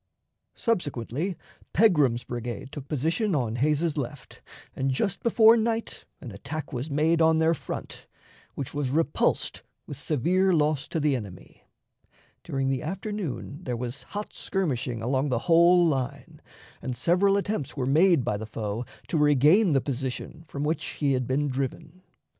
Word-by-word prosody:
Subsequently, 165 Hz, -, -2 dB, 0.4 s
Pegram's 150 Hz, -, +4 dB
brigade 120 Hz, +2 st, -5 dB
took 140 Hz, -2 st, -8 dB
position 165 Hz, -, 0 dB
on 120 Hz, -4 st, -1 dB
Hays's 150 Hz, +4 st, +1 dB
left, 140 Hz, 0 st, -6 dB, 0.3 s
and 135 Hz, +1 st, -1 dB
just 175 Hz, +9 st, -1 dB
before 230 Hz, -1 st, +6 dB
night 225 Hz, 0 st, -2 dB, 0.2 s
an 120 Hz, -, -8 dB
attack 140 Hz, +9 st, -6 dB
was 130 Hz, +5 st, -3 dB
made 160 Hz, +3 st, +2 dB
on 160 Hz, 0 st, +5 dB
their 160 Hz, +1 st, +3 dB
front, 160 Hz, -, -7 dB, 0.5 s
which 140 Hz, -, -5 dB
was 145 Hz, -3 st, -1 dB
repulsed 155 Hz, +2 st, 0 dB, 0.2 s
with 145 Hz, -, -6 dB
severe 175 Hz, +7 st, +1 dB
loss 150 Hz, -2 st, +1 dB
to 165 Hz, -, -2 dB
the 150 Hz, -2 st, +2 dB
enemy. 100 Hz, -7 st, -9 dB, 0.8 s
During 135 Hz, 0 st, -2 dB
the 135 Hz, -1 st, -1 dB
afternoon 190 Hz, -, -4 dB
there 125 Hz, -5 st, -3 dB
was 125 Hz, +3 st, -5 dB
hot 205 Hz, +1 st, -7 dB
skirmishing 130 Hz, -, -2 dB
along 130 Hz, +4 st, 0 dB
the 125 Hz, -, +1 dB
whole 175 Hz, +1 st, +6 dB
line, 135 Hz, -6 st, -2 dB, 0.4 s
and 125 Hz, -2 st, -4 dB
several 185 Hz, -, +3 dB
attempts 200 Hz, -9 st, -3 dB
were 130 Hz, -, 0 dB
made 155 Hz, 0 st, +4 dB
by 120 Hz, -4 st, 0 dB
the 110 Hz, +1 st, -6 dB
foe 110 Hz, +2 st, -4 dB, 0.2 s
to 160 Hz, -, 0 dB
regain 150 Hz, -, +5 dB
the 135 Hz, -, +3 dB
position 135 Hz, +4 st, -4 dB
from 140 Hz, 0 st, -4 dB
which 155 Hz, +3 st, -1 dB
he 140 Hz, -2 st, +1 dB
had 125 Hz, -2 st, -1 dB
been 145 Hz, +3 st, +1 dB
driven. 140 Hz, +6 st, -4 dB
145 Hz, 155 wpm, -26 LUFS, 130-170 Hz, 0.8 s, before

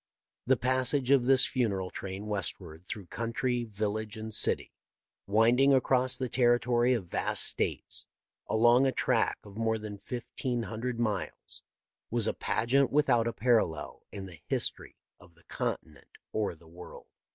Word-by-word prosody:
The 130 Hz, 0 st, +4 dB
passage 130 Hz, +2 st, +1 dB
of 135 Hz, -3 st, +5 dB
this 130 Hz, 0 st, +6 dB
funeral 100 Hz, -8 st, -1 dB
train 95 Hz, +2 st, -6 dB
westward 90 Hz, -5 st, -4 dB
through 100 Hz, -4 st, -6 dB
country, 120 Hz, +4 st, -2 dB
village, 110 Hz, 0 st, -3 dB
and 110 Hz, 0 st, -6 dB
city, -, -, +1 dB, 0.5 s
winding 120 Hz, +7 st, +4 dB
across 130 Hz, 0 st, +2 dB
the 130 Hz, -, -2 dB
territory 120 Hz, 0 st, +3 dB
of 115 Hz, -7 st, -2 dB
vast 85 Hz, -, 0 dB
States, -, -, -2 dB, 0.4 s
along 120 Hz, +4 st, +5 dB
a -, -, +2 dB
track -, -, +1 dB
of 100 Hz, -1 st, -13 dB
more 110 Hz, 0 st, +1 dB
than 105 Hz, -2 st, -7 dB
fifteen 120 Hz, +2 st, -4 dB
hundred 115 Hz, +2 st, -4 dB
miles,. 105 Hz, -5 st, -3 dB, 0.5 s
was 115 Hz, -2 st, +1 dB
a -, -, 0 dB
pageant 135 Hz, +3 st, +1 dB
without 130 Hz, -6 st, +3 dB
a -, -, 0 dB
parallel 110 Hz, -9 st, 0 dB
in 100 Hz, -1 st, -6 dB
the 85 Hz, -5 st, -12 dB
history -, -, 0 dB, 0.2 s
of 90 Hz, -2 st, -19 dB
the 85 Hz, -, -20 dB
continent 75 Hz, -3 st, -5 dB, 0.2 s
or 105 Hz, -5 st, -1 dB
the 80 Hz, 0 st, -19 dB
world. 85 Hz, +2 st, -12 dB
115 Hz, 150 wpm, -30 LUFS, 100-125 Hz, 0.5 s, this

